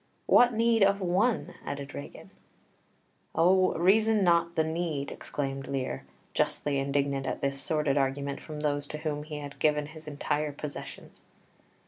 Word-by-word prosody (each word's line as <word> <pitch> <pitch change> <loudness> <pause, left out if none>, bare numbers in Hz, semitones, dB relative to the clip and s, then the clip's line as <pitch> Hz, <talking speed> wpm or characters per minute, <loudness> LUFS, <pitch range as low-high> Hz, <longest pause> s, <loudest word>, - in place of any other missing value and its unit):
"What 245 0 +6
need 230 0 +3
of 195 0 +4
one?" 195 +6 +1
added 140 0 -5
Regan. 140 - -9 1.0
"O, 185 +2 +4
reason 215 +4 +4
not 170 -1 +3
the 160 - +3
need," 160 -3 -2
exclaimed 135 -1 -4
Lear, 130 - -3 0.3
justly 140 -2 0
indignant 140 0 0
at - - -3
this 140 0 -1
sordid 150 -2 +1
argument 140 +1 -1
from 150 -2 -7
those 145 -1 0
to 150 - -5
whom 150 -1 -3
he 150 0 -6
had 145 -1 -8
given 150 -1 +2
his 155 +1 -11
entire 150 0 -1
possessions. 145 0 -8
150 Hz, 145 wpm, -29 LUFS, 140-175 Hz, 1.0 s, What